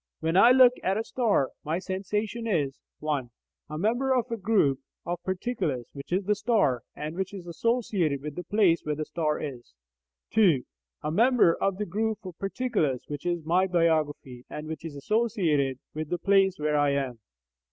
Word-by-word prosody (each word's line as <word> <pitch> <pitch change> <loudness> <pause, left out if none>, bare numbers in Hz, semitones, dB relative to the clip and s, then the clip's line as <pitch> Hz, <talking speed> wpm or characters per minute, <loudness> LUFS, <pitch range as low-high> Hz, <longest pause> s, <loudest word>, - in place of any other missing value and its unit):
When 165 +1 -1
I 195 +6 +8
look 255 -1 +7
at 190 +2 0
a 220 - -1
star, 225 - +1
my 155 +2 -1
sensation 210 +5 -3
is 145 -9 0 0.2
(1) 145 -5 -1 0.4
A 155 - -5
member 240 +8 +1
of 245 -1 +1
the 230 - -1
group 195 -11 +2 0.3
of 175 0 -3
particulars 185 - -2
which 140 +2 -9
is 185 +3 +1
the 210 +2 +2
star, 205 - +1
and 155 +2 -5
which 190 +2 -3
is 185 -3 -8
associated 180 - 0
with 150 -1 -5
the 180 - -6
place 195 -5 +3
where 150 0 -1
the 155 +1 -3
star 155 -2 -1
is; 125 - -7 0.6
(2) 180 -12 +4 0.4
A 150 - -1
member 230 -1 +4
of 195 +1 -1
the 210 - -2
group 215 +4 -1
of 180 -3 -7
particulars 195 - -1
which 145 +3 -5
is 175 -3 -1
my 180 +4 +3
biography, 155 -7 0
and 150 - -6
which 160 0 -6
is 160 -3 -7
associated 160 - +1 0.2
with 155 0 -4
the 175 - 0
place 195 0 +3
where 150 0 0
I 145 -1 +3
am. 130 -4 -2
175 Hz, 185 wpm, -27 LUFS, 150-210 Hz, 0.6 s, I